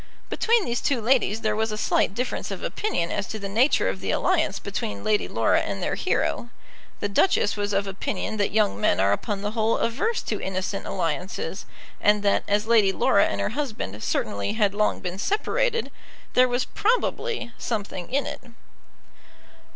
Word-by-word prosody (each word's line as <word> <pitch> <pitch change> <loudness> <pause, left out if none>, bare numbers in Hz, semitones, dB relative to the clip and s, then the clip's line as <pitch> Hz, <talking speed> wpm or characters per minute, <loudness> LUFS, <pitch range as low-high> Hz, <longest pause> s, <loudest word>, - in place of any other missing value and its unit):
Between 460 -3 +2
these 240 0 -1
two 275 -4 +1
ladies 225 -2 +2
there 215 -2 +1
was 220 0 0
a 215 - -3
slight 200 - +1
difference 250 +3 -2
of - - -5
opinion 425 - -1
as 195 - -2
to 220 - -5
the 200 -2 -5
nature 230 - +3
of 95 0 -2
the - - -4
alliance - - +1
between 100 -1 -4
Lady 210 -1 +1
Laura - - +2
and - - -3
their - - -1
hero. 235 - 0 0.5
The - - +1
Duchess 205 - +2
was 205 0 -2
of 200 0 +1
opinion 195 +2 -3
that 205 - +1
young 105 - +1
men 90 - +3
are 100 +1 +4
upon 200 - -3
the 205 - -1
whole 225 0 +1
averse 365 - 0
to - - -3
innocent 190 +1 -3
alliances, 185 - -3 0.3
and 210 0 +3
that, 200 - +2
as 205 +1 +1
Lady 220 -4 +5
Laura 140 - +3
and 100 - -3
her 100 - 0
husband 220 - -4
certainly 100 - -1
had 210 -3 +2
long 210 +1 +1
been 180 0 -4
separated, 470 - 0 0.4
there 255 0 +6
was 245 +1 0
probably 460 - 0
something 205 -4 -4
in 280 +2 +1
it. - - -5
210 Hz, 180 wpm, -25 LUFS, 195-250 Hz, 0.5 s, there